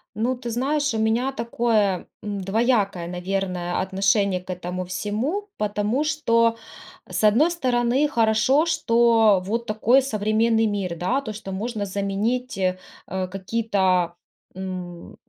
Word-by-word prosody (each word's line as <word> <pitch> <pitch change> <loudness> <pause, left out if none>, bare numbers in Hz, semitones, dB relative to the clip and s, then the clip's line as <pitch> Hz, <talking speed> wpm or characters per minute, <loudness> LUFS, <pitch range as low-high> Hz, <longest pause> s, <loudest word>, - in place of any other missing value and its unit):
Ну, 240 +4 0
ты 240 -1 -6
знаешь, 285 +3 0
у - - -1
меня 230 +5 +1
такое, 230 -6 0 0.2
м, 205 -1 -4
двоякое, 200 -3 +1
наверное, 180 -1 -2
отношение 195 0 +1
к 180 - -23
этому 180 0 -4
всему. 220 - -2
Потому 210 +6 0
что, 230 -7 +2 0.5
с - - -3
одной 235 +11 +5
стороны, 255 -3 +1
хорошо, 230 +4 +3
что 230 - +3
вот 230 +3 -2
такой 230 +5 +3
современный 225 -1 +1
мир, 195 -5 -2
да, 245 +11 0
то, 215 - -6
что 200 -2 -7
можно 215 +1 -3
заменить, 200 +5 -2
э, 185 -1 0 0.3
какие-то, 190 -1 0 0.4
м, 185 -2 -7
215 Hz, 125 wpm, -23 LUFS, 190-240 Hz, 0.5 s, одной